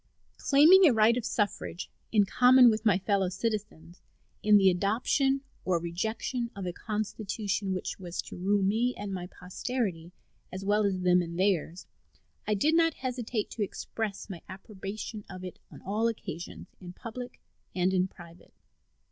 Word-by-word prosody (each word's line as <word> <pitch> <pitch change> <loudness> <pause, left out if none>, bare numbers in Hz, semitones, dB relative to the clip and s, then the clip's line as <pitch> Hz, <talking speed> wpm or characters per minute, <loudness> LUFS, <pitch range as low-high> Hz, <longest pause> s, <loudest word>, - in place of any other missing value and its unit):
Claiming 335 +7 +7
a 275 - +5
right 220 +1 +4
of 245 - -2
suffrage, 205 -4 -2 0.2
in 210 -3 +4
common 250 +3 +6
with 220 +1 -1
my 200 -4 +5
fellow 195 -1 +1
citizens, 190 -4 -4 0.4
in 210 0 +6
the 195 -2 +5
adoption 245 +8 +1 0.2
or 185 -2 +1
rejection 220 +8 -3
of 195 -2 -5
a 180 - -3
constitution 210 -1 -3
which 185 - -5
was 175 -2 -7
to - - -10
rule 195 +2 +1
me 225 +6 +1
and 205 -1 -5
my 180 -1 -5
posterity, 180 -2 -4 0.4
as 190 +1 -6
well 210 +1 +2
as 190 -2 0
them 180 0 +4
and 170 0 -5
theirs, 185 -2 0 0.6
I 210 - +2
did 300 +11 +2
not 330 -2 +3
hesitate 245 -4 -3
to 225 - -6
express 205 0 -4
my 185 -5 -8
approbation 200 +2 -7
of 185 - -8
it 185 - -8
on - - -14
all 215 +4 0
occasions, 175 -6 -6
in 180 -1 -10
public 245 +5 -8 0.4
and 185 +1 +1
in 185 0 +2
private. 170 -2 -16
205 Hz, 160 wpm, -29 LUFS, 185-230 Hz, 0.6 s, Claiming